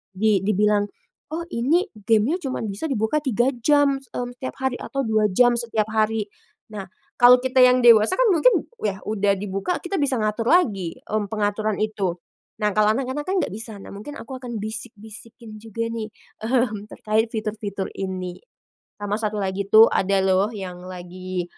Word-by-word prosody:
di 210 0 +3
dibilang, 210 0 +2 0.5
"Oh 335 +1 -2
ini 285 +10 +2
game-nya 220 - +1
cuman 260 -3 -3
bisa 200 +11 -5
dibuka 220 +4 +1
3 245 -1 +2
jam, 285 +1 +3
mmm, 245 -2 -6
setiap 260 - -5
hari, 265 -1 0
atau 275 -1 -3
2 215 -1 +3
jam 245 +5 +5
setiap 220 -2 -1
hari." 220 -1 0 0.4
Nah, 195 -3 -6 0.3
kalau 245 0 +8
kita 260 0 +1
yang 250 0 +6
dewasa 230 +6 +6
kan - - +3
mungkin 450 +9 +4 0.2
yah 195 -2 -1
udah 205 -2 +1
dibuka 195 - -2
kita 385 +2 -2
bisa 275 -3 +1
ngatur 215 +2 -1
lagi, 200 - +2
m 215 -1 0
pengaturan 210 0 -1
itu. 200 -5 -2 0.5
Nah 210 - +3
kalau 215 0 +4
anak-anak 270 +3 -3
kan 380 - 0
nggak - - -4
bisa, 220 +1 -7
nah - - -11
mungkin 290 +9 -8
aku 265 -2 -8
akan 240 -3 -5
bisik-bisikin 220 0 -8
juga 230 +1 -4
nih, 225 -2 -4 0.4
mmm, 220 -4 0
terkait 220 +1 0
fitur-fitur 210 -3 -4
ini. 185 -2 -4 0.6
Sama 205 0 -2
satu 215 -1 -2
lagi 195 0 -2
tuh 220 +2 +8
ada 195 +1 +2
loh 190 +1 +3
yang 185 -3 -7
lagi, 185 0 -6
215 Hz, 165 wpm, -23 LUFS, 205-250 Hz, 0.6 s, kalau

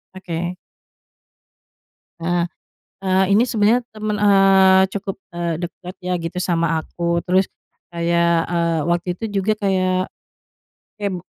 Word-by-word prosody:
Oke. 175 -1 -4 1.7
Eh, 175 0 +1 0.6
eee, 190 0 +3
ini 215 +4 +5
sebenarnya 225 +2 +3
teman, 215 -1 -2
eee, 195 -2 +6
cukup, 195 -1 -4 0.2
eee, 170 -1 -2
deket 180 +1 -7
ya 180 - -1
gitu 165 +2 -5
sama 165 -2 0
aku, 170 -1 -2
terus 185 +1 +2 0.4
kayak, 170 0 +2
eee, 170 -1 +1
waktu 175 +1 -1
itu 205 -1 -3
juga 215 +3 +1
kayak 185 -2 0 0.9
kayak 200 -2 -2
be - - -14
185 Hz, 120 wpm, -20 LUFS, 170-195 Hz, 1.7 s, eee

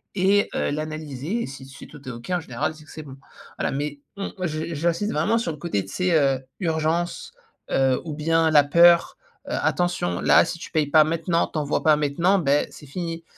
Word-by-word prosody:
et 200 +2 +3
heu, - - 0
l'analyser 155 - -4
et - - -5
si 135 0 -10
si 135 +1 -12
tout 150 -1 -13
est - - -4
OK 120 +8 -9
en 180 - +1
général 155 -1 -3
c'est 155 -1 -16
que - - -15
c'est 155 - -8
bon. 135 -2 -11 0.4
Voilà, - - 0
mais 145 +1 -4 0.2
on 195 - -4
moi 180 - -1
j'in 155 0 -3
j'insiste 170 +6 -1
vraiment 195 +10 +1
sur 225 -8 -2
le 155 - -8
côté 145 - -2
tu 95 - -11
sais, 180 -1 0
heu, 135 -2 +2 0.2
urgence, 170 - -1 0.4
heu, 130 -1 +2
ou 155 -3 -6
bien 165 +1 +2
la 150 -2 +6
peur, 170 +3 +5 0.3
heu, - - -6
«attention 175 - 0
là - - +6
si - - -4
tu - - -9
payes 155 -3 +1
pas 155 +1 +6
maintenant 165 +2 0
tu 155 - -4
envois 145 -1 -1
pas 155 -1 +5
maintenant, 165 +7 +2
ben, 145 -3 +2
c'est 145 - -13
fini». 165 +2 -5
155 Hz, 220 wpm, -23 LUFS, 145-175 Hz, 0.4 s, la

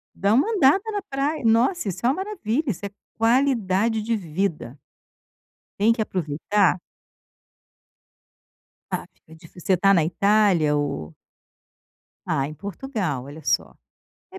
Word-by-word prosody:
Dar 200 +2 +1
uma 275 - +3
andada 380 -2 +4
na 410 -1 -2
pra 295 -3 -2
Nossa, 235 - +2
isso 185 +3 -4
é - - +5
uma 270 - +1
maravilha, 325 - -2
isso 205 -4 -3
é - - -4 0.3
qualidade 225 -3 +2
de 230 +2 -1
vida. 165 - -3 1.0
Tem 220 +3 +4
que 230 - -3
aproveitar 185 +1 0 2.1
Ah, - - -2
fica 160 - -20
difícil. 165 +2 -15
Você 185 +2 +2
tá 195 +3 +4
na 170 -4 +4
Itália 180 -2 +3
ou 80 - -3 1.1
Ah, 135 - 0
em 155 - -8
Portugal, 195 - -4
olha 145 +3 -11
só. - - 0 0.6
É 380 - -9
205 Hz, 135 wpm, -23 LUFS, 165-250 Hz, 2.1 s, é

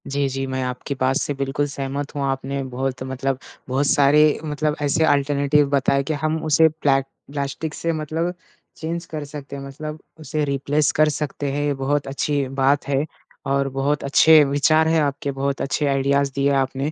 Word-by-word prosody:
जी, 140 0 0
जी 135 0 -3
मैं 130 0 -2
आपकी 125 +2 -4
बात 130 +1 +2
से 145 - -1
बिल्कुल 135 +1 -1
सहमत 140 0 -4
हूँ, 140 - -1
आपने 135 +1 -2
बहुत 130 0 -3
मतलब 130 0 -2 0.3
बहुत 135 +3 +1
सारे 145 +2 +4
मतलब 150 0 -1
ऐसे 150 +2 +2
ऑल्टरनेटिव 145 0 +2
बताए 140 0 +2
कि 155 - -2
हम 155 +2 -1
उसे 160 +1 +5
प्लेक 140 -3 +1 0.3
प्लास्टिक 140 +2 -3
से 165 - -2
मतलब 160 +3 -2 0.4
चेंज 170 +1 -4
कर 155 -3 -6
सकते 145 -1 -8
हैं, 140 - -7
मतलब 150 +3 -7 0.2
उसे 155 -1 -2
रिप्लेस 140 +2 +1
कर 155 0 +3
सकते 145 -1 -3
हैं, 145 +1 -1
ये 145 - +1
बहुत 140 +1 -1
अच्छी 140 0 -1
बात 135 +2 +1
है 140 +1 +1 0.4
और 140 0 +1
बहुत 140 +2 0
अच्छे 155 +2 +6
विचार 150 +3 +3
हैं 160 0 +3
आपके, 145 -1 -1
बहुत 135 0 -2
अच्छे 145 +2 -1
आइडियाज़ 140 0 +1
दिए 140 0 +2
आपने। 135 +2 0
140 Hz, 180 wpm, -22 LUFS, 135-150 Hz, 0.4 s, अच्छे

